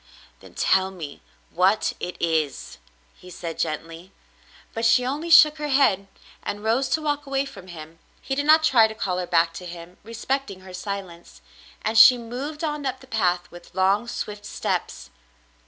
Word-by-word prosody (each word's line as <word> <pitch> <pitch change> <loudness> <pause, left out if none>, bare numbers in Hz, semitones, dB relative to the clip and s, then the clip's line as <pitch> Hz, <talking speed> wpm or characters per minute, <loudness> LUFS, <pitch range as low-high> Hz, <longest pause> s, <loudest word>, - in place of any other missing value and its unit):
"Then - - -16
tell 190 0 +2
me 165 -7 -9 0.3
what 190 +5 +2
it 180 - -5
is," 160 -4 -2 0.4
he 180 - -14
said 170 -2 -7
gently. 165 +3 -4 0.6
But 225 - -4
she 230 +2 +4
only 295 +6 -3
shook 315 -2 +7
her 300 - -3
head 265 -9 +2 0.3
and 205 +1 -5
rose 235 +5 +1
to 315 - 0
walk 290 -1 -2
away 275 0 0
from 200 -9 -12
him. 165 -1 -11 0.2
He 270 - -4
did 285 +2 -1
not 315 +1 +6
try 240 -8 +5
to 220 - -9
call 185 -4 -2
her 180 - -4
back 165 -1 +2
to 180 - -8
him, 170 +1 -10
respecting 230 -1 -4
her 185 -1 -12
silence, 185 - -7 0.4
and 220 +1 +2
she 250 +3 +9
moved 260 +7 -6
on 300 -2 -2
up 260 -1 -3
the 265 - -15
path 175 -7 -1
with 175 0 -14
long, 195 +4 +2
swift 210 -3 -6
steps. 205 - -4
205 Hz, 175 wpm, -24 LUFS, 175-270 Hz, 0.6 s, she